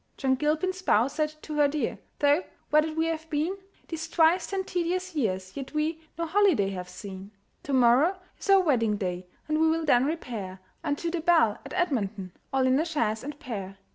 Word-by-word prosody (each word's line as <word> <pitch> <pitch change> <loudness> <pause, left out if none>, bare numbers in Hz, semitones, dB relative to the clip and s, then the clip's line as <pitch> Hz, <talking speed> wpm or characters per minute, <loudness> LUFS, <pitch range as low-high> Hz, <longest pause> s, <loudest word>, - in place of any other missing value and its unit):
John 265 -1 +2
Gilpin's 310 +7 0
spouse 265 - +2
said 310 0 -1
to 305 -1 -5
her 295 -1 +5
dear, 295 +1 -2 0.2
"Though 290 +4 +3 0.3
wedded 310 +1 +3
we 320 - +2
have 320 -1 -3
been 315 +5 0 0.3
These 325 -1 -5
twice 335 +2 +3
ten 390 -1 -2
tedious 365 0 -2
years, 190 -9 -2
yet 275 +2 -7
we 315 +1 -1 0.2
No 335 - -1
holiday 330 - +3
have 180 -1 -6
seen. 190 +1 -9 0.3
"To 280 - -6
morrow 260 +9 +4 0.2
is - - -8
our 390 -1 +7
wedding 230 - +2
day, 180 -2 -3 0.2
And 310 0 +1
we 320 - +5
will 325 0 0
then 250 -3 +4
repair 230 - -4 0.2
Unto 315 +2 -1
the 345 -1 -2
'Bell' 320 - +3
at - - -9
Edmonton, 215 - -1 0.2
All 265 -1 +2
in 260 +2 +3
a 320 - +1
chaise 230 -10 -1
and 290 +1 -7
pair. 200 - -6
300 Hz, 195 wpm, -27 LUFS, 225-330 Hz, 0.3 s, our